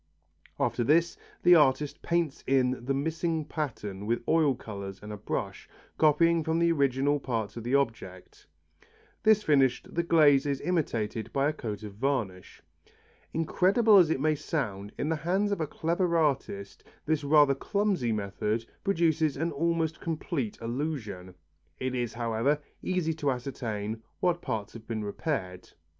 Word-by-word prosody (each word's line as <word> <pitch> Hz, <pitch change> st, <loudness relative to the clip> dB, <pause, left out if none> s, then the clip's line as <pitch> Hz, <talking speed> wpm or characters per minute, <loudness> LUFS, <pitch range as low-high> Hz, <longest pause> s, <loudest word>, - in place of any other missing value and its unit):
After 120 Hz, -, +1 dB
this 165 Hz, +6 st, +3 dB, 0.3 s
the 180 Hz, -, +7 dB
artist 150 Hz, -2 st, +3 dB
paints 170 Hz, -4 st, -1 dB
in 130 Hz, -2 st, +1 dB
the 135 Hz, -, 0 dB
missing 160 Hz, +2 st, -1 dB
pattern 105 Hz, -11 st, -5 dB
with 120 Hz, +1 st, 0 dB
oil 155 Hz, -5 st, +3 dB
colours 100 Hz, -5 st, -7 dB
and 105 Hz, 0 st, -8 dB
a -, -, -6 dB
brush, 100 Hz, -, -4 dB, 0.3 s
copying 165 Hz, +2 st, +4 dB
from 160 Hz, +1 st, 0 dB
the 170 Hz, 0 st, +3 dB
original 140 Hz, -1 st, +2 dB
parts 115 Hz, -6 st, -3 dB
of 115 Hz, -, -6 dB
the 125 Hz, +4 st, +1 dB
object. 115 Hz, -9 st, -3 dB, 0.7 s
This 215 Hz, -1 st, +4 dB
finished, 135 Hz, -6 st, +2 dB
the 170 Hz, -, +1 dB
glaze 150 Hz, -4 st, +4 dB
is 140 Hz, -1 st, -1 dB
imitated 120 Hz, -10 st, -1 dB
by 140 Hz, +1 st, +1 dB
a -, -, -2 dB
coat 110 Hz, -8 st, -6 dB
of 105 Hz, -2 st, -7 dB
varnish. 110 Hz, -6 st, -3 dB, 0.7 s
Incredible 195 Hz, +7 st, +4 dB
as 175 Hz, -4 st, +6 dB
it 160 Hz, -, 0 dB
may 155 Hz, +2 st, +2 dB
sound, 110 Hz, -10 st, -3 dB
in -, -, -2 dB
the 160 Hz, -, +1 dB
hands 190 Hz, +6 st, 0 dB
of 200 Hz, -, -1 dB
a 155 Hz, -, -1 dB
clever 170 Hz, +3 st, 0 dB
artist 135 Hz, -10 st, -1 dB, 0.2 s
this 155 Hz, -1 st, 0 dB
rather 145 Hz, -1 st, +5 dB
clumsy 190 Hz, -, 0 dB
method 105 Hz, +2 st, -2 dB, 0.2 s
produces 165 Hz, -6 st, +1 dB
an 165 Hz, +1 st, -1 dB
almost 165 Hz, +1 st, -1 dB
complete 155 Hz, -, -3 dB
illusion. 115 Hz, -, -4 dB, 0.4 s
It 130 Hz, 0 st, -2 dB
is, 120 Hz, -3 st, -2 dB
however, 120 Hz, +5 st, +1 dB, 0.2 s
easy 180 Hz, -3 st, 0 dB
to 150 Hz, -2 st, -1 dB
ascertain 115 Hz, -4 st, -4 dB, 0.2 s
what 175 Hz, -1 st, +1 dB
parts 105 Hz, -1 st, -4 dB
have 115 Hz, -1 st, -11 dB
been 110 Hz, -2 st, -3 dB
repaired. 100 Hz, -, -4 dB
140 Hz, 150 wpm, -28 LUFS, 115-165 Hz, 0.7 s, the